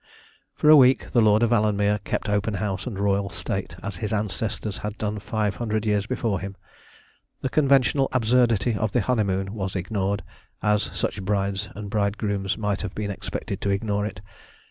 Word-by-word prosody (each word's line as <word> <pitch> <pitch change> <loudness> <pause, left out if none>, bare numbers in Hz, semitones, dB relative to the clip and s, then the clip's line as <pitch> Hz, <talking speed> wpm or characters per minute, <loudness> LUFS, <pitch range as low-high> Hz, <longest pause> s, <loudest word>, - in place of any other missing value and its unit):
For - - 0
a - - +11
week 130 -2 +5
the 120 - +4
Lord 110 +1 +4
of 115 - +2
Alanmere 105 -2 +2
kept - - -2
open 105 +1 0
house 95 +1 -3
and 110 -6 -4
royal 100 0 +1
state, - - -4
as 100 -2 -4
his 105 +4 -3
ancestors 105 0 -2
had 105 0 -5
done 105 -1 -2
five 105 0 -1
hundred 110 -2 -1
years 105 -1 +1
before 115 -6 -1
him. 100 +1 -6 0.9
The 130 - -1
conventional 135 -1 +3
absurdity 120 -2 +3
of 105 0 -1
the 120 - +3
honeymoon 95 -4 0
was 95 -3 -4
ignored, 100 +2 -1 0.4
as 105 -1 +3
such 100 - -2
brides 100 +1 -1
and 100 0 -7
bridegrooms 100 -2 0
might 105 -2 -1
have 105 -3 -5
been 105 -1 -2
expected 100 - -5
to 100 - 0
ignore 105 +1 0
it. 100 -2 -8
105 Hz, 175 wpm, -25 LUFS, 100-110 Hz, 0.9 s, a